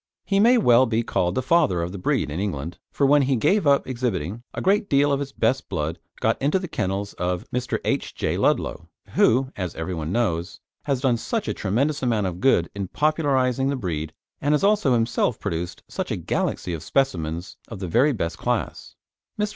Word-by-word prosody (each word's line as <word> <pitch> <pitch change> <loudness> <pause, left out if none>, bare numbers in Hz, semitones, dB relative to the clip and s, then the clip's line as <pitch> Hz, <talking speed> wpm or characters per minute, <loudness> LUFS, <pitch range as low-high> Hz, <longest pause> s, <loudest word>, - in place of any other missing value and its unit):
He 195 -1 +1
may 240 +4 +6
well 130 - +5
be 115 +1 0
called 90 -5 0
the 130 - 0
Father 130 - +3
of 85 - -4
the 100 - -7
breed 75 -4 0
in 80 - -3
England, 85 -5 -4
for 140 - +1
when 145 +1 +5
he 135 0 +2
gave 155 - +2
up 140 0 +4
exhibiting, 115 - -3
a - - -5
great 200 +2 +2
deal 145 +1 +3
of 140 - +1
his 140 -1 -4
best 130 +1 0
blood 80 +4 -2 0.2
got 115 - +1
into 145 +7 +2
the 185 -1 -4
kennels 100 - -2
of 90 0 -2
Mr. 125 0 -1
H. - - -1
J. - - -1
Ludlow, - - 0 0.2
who, 130 +3 +3
as 90 -4 -4
everyone 80 -1 -4
knows, 95 -5 -1 0.3
has 135 -3 0
done 130 -4 +2
such 220 - -3
a - - 0
tremendous 135 +9 0
amount 115 -5 +1
of 90 -1 -3
good 85 -11 +3
in 100 -1 -4
popularising 135 - +1
the 140 - 0
breed 80 - -3 0.3
and 145 +1 +3
has 150 - -1
also 200 -10 +3
himself 115 0 0
produced 90 -2 -4
such - - -4
a - - -1
galaxy 90 - -2
of 80 - -4
specimens 85 - -1
of 115 - -8
the 95 -1 -5
very 125 - +3
best 85 -9 -3
class. - - -3 0.4
Mr. 210 0 +1
120 Hz, 205 wpm, -24 LUFS, 90-140 Hz, 0.4 s, may